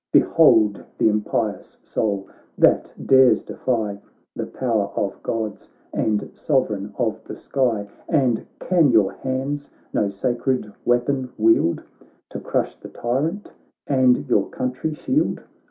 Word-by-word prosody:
Behold 105 -2 +4
the - - +3
impious 105 -1 -2
soul, 100 -3 -2 0.3
that - - +3
dares 130 -5 +5
defy 110 -5 -2 0.4
The - - -4
power 115 -6 0
of 100 -2 -2
Gods 110 -2 -4 0.2
and 105 -2 -1
Sovereign 105 -8 -1
of 110 -2 -1
the - - -7
sky! 120 -7 -1 0.2
And 130 -8 +1
can 170 -5 +3
your 110 -5 +4
hands 135 +2 -3 0.2
no 100 - +1
sacred 120 +1 -1
weapon 125 +2 +1
wield 110 -6 +3 0.5
To - - -6
crush - - -2
the - - -10
tyrant, 150 +12 -2 0.3
and 130 0 +3
your 105 -6 +2
country 130 +5 -3
shield? 285 - 0
120 Hz, 120 wpm, -22 LUFS, 105-130 Hz, 0.5 s, dares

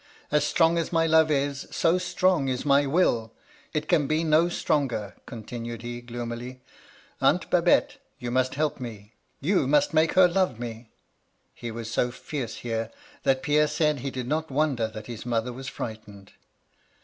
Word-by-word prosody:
As 150 -1 +3
strong 165 +2 +3
as 165 - -2
my 165 -1 +3
love 160 -1 +5
is, 140 -1 -1
so 170 +2 +2
strong 180 -4 +1
is 130 +1 -2
my 140 0 +4
will. 120 -8 +1 0.4
It 155 0 -2
can 155 -6 +3
be 155 +2 +1
no 160 +2 +4
stronger,' 130 - -1
continued 115 0 -7
he, 120 0 -5
gloomily, 120 +1 -6 0.6
*Aunt - - +3
Babette, - - +3 0.2
you 120 -1 -5
must 130 +1 +1
help 150 0 -1
me 110 -3 -8
— - - -28
^you 165 -5 +2
must 150 +1 +3
make 160 +1 +3
her 185 -1 +7
love 175 - 0
me.' 115 -1 -7 0.6
He 120 - -7
was 115 0 -6
so 125 - +1
fierce 125 -1 -5
here, 115 -1 -2 0.3
that 130 -1 +1
Pierre 150 +1 +3
said 150 -2 +1
he 135 +2 -3
did 130 -2 -5
not 155 +3 -1
wonder 135 -5 +1
that 110 -1 -9
his 115 -2 -7
mother 120 0 -1
was 130 +2 -8
frightened. 105 -6 -7
135 Hz, 175 wpm, -26 LUFS, 120-155 Hz, 0.6 s, her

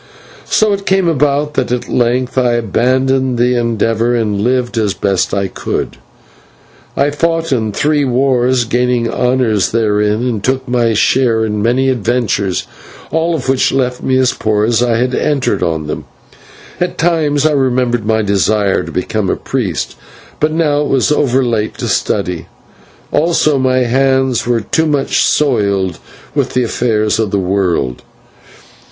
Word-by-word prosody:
So 215 -1 +3
it 200 0 -5
came 190 -2 +2
about 150 -1 +1
that 125 -2 -1
at 125 -1 -2
length 125 +1 0
I 125 -2 +2
abandoned 130 +3 +1
the 125 +1 +2
endeavour, 115 0 0
and 105 -4 -1
lived 125 +1 0
as 105 -3 0
best 100 -2 0
I 100 -1 -1
could. - - -4 1.0
I 140 +1 +2
fought 165 +1 -1
in 110 -5 0
three 150 +6 +1
wars, 130 -1 +2
and 115 - -12
gained 125 -1 +1
honours 125 -5 +1
therein, 105 +1 +1
and 110 -5 -3
took 130 0 -1
my 120 -2 +1
share 115 0 +2
in 105 -1 -2
many 125 +4 +1
adventures, 115 -5 -1 0.5
all 165 +1 0
of 130 -5 -5
which 135 -1 +2
left 125 -2 -1
me 130 0 +1
as 130 -1 +2
poor 105 -1 0
as 115 0 +1
I 120 -2 +1
had 125 +2 0
entered 140 0 0
on 80 -2 -1
them. 75 - -5 0.7
At 180 0 -2
times 155 -4 +1
I 155 - +4
remembered 125 -4 +1
my 110 +1 +1
desire 100 0 +1
to - - -8
become 95 +2 -2
a - - +1
priest, 110 - -3 0.4
but 155 +1 +1
now 155 -2 +1
it 150 - -1
was 135 +1 +1
over 135 -3 +2
late 115 -3 -1
to - - -4
study; 90 -2 -1 0.6
also 155 -3 +2
my 130 -1 +2
hands 130 0 +1
were 120 -2 +1
too 160 +8 0
much 145 -3 0
soiled 100 - +1 0.3
with - - -1
the 125 - +2
affairs 110 -2 0
of 110 -2 0
the 100 - 0
world. 90 -9 -1
125 Hz, 160 wpm, -14 LUFS, 110-135 Hz, 1.0 s, I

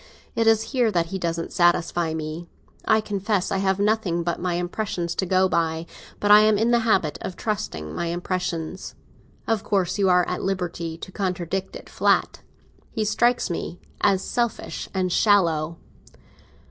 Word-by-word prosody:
It 230 0 +1
is 225 0 +3
there 245 -5 +2
that 170 -3 +1
he 190 - -2
doesn't 170 -1 -3
satisfy 175 -1 +2
me. 160 +2 -5 0.4
I 220 0 +4
confess 205 -2 -1
I 195 - +1
have 190 -1 +1
nothing 200 -5 +1
but 170 0 -2
my 180 -1 -1
impression 175 +1 -2
to 170 +3 -2
go 185 +1 +3
by; 165 -2 0 0.3
but 205 - +2
I 210 - +10
am 215 0 +4
in 225 +3 +2
the 240 - +4
habit 195 -9 +1
of 185 - -5
trusting 130 - -4
my 170 - -2
impression. 175 -1 -2 0.7
Of 225 -3 0
course 190 -1 0
you 195 -1 +3
are 180 -1 +4
at 180 - -2
liberty 175 -4 -3
to 190 - -9
contradict 185 -1 -3
it - - -9
flat. - - +1 0.5
He 220 - -2
strikes 240 0 +2
me 170 +1 -4 0.2
as 195 -2 +3
selfish 235 -2 -2
and 185 -2 -1
shallow." 165 -6 +3
185 Hz, 165 wpm, -24 LUFS, 170-210 Hz, 0.7 s, I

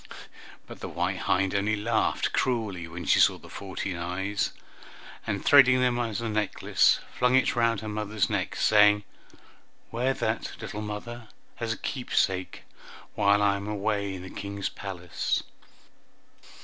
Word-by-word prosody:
But - - -11
the - - -6
white - - -2
hind 95 0 +2
only 100 +2 +1
laughed 105 - 0
cruelly 105 -9 -1
when 85 +1 -7
she - - +4
saw - - +5
the - - -15
fourteen 95 -2 -5
eyes, 95 +4 -2 0.8
and - - -2
threading 130 -3 +7
them 125 -1 +2
as 115 -2 -2
a 115 - -2
necklace, 105 -2 +2 0.2
flung 125 +1 +3
it 130 - +3
round 115 -3 +2
her 110 - -6
mother's 105 -2 -1
neck, - - -2
saying, 105 -1 +5 0.9
"Wear 125 +3 0
that, - - -2
little 105 - -6
mother, 110 +2 -6 0.3
as 115 -1 -2
a 115 - -2
keepsake, 95 -8 -1 0.5
while 100 0 +3
I 100 -1 +3
am 100 +1 -5
away 100 -1 -1
in 90 - -8
the 95 - -9
King's 100 0 -4
palace." 90 -4 -3
105 Hz, 150 wpm, -27 LUFS, 100-115 Hz, 0.9 s, threading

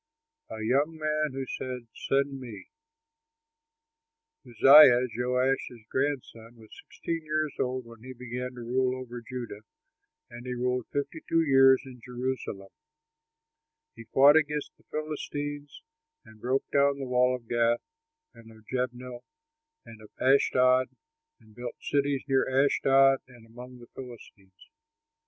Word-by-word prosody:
A 110 0 -6
YOUNG 145 +8 +1
MAN 155 -2 -1
WHO 135 0 -4
SAID, 125 -2 -6
"SEND 135 0 -1
ME" 125 -3 -10 1.8
Uzziah, 130 +1 +8
Joash's 125 -1 -1
grandson, 130 -4 -3
was 110 -2 -16
sixteen 165 -1 -4
years 155 -1 -2
old 130 0 -2
when 115 -1 -14
he 130 +2 -9
began 125 0 -6
to 120 - -8
rule 130 +2 -1
over 120 -1 -8
Judah 120 -3 -7 0.7
and 120 +1 -11
he 125 - -3
ruled 125 0 -2
fifty 145 +3 -4
two 165 0 +3
years 135 -2 +5
in 125 -2 -12
Jerusalem. 125 -6 -5 1.2
He - - -11
fought 140 +3 +6
against 150 -1 -1
the - - -30
Philistines, 145 - -5 0.4
and 110 -1 -17
broke 130 +2 -1
down 140 0 +3
the 135 - -5
wall 125 0 +2
of 120 -2 -11
Gath 120 0 +1 0.5
and 115 -1 -15
of 110 -1 -18
Jabneh 125 0 -4 0.7
and 110 -1 -13
of 105 - -14
Ashdod 130 -1 +3 0.5
and 110 -2 -21
built 120 +1 -7
cities 140 -1 -1
near 135 -1 +1
Ashdod 135 0 +4
and 120 -3 -17
among 125 +2 -12
the 120 -1 -14
Philistines. 105 -7 -13
130 Hz, 135 wpm, -28 LUFS, 120-140 Hz, 1.8 s, Uzziah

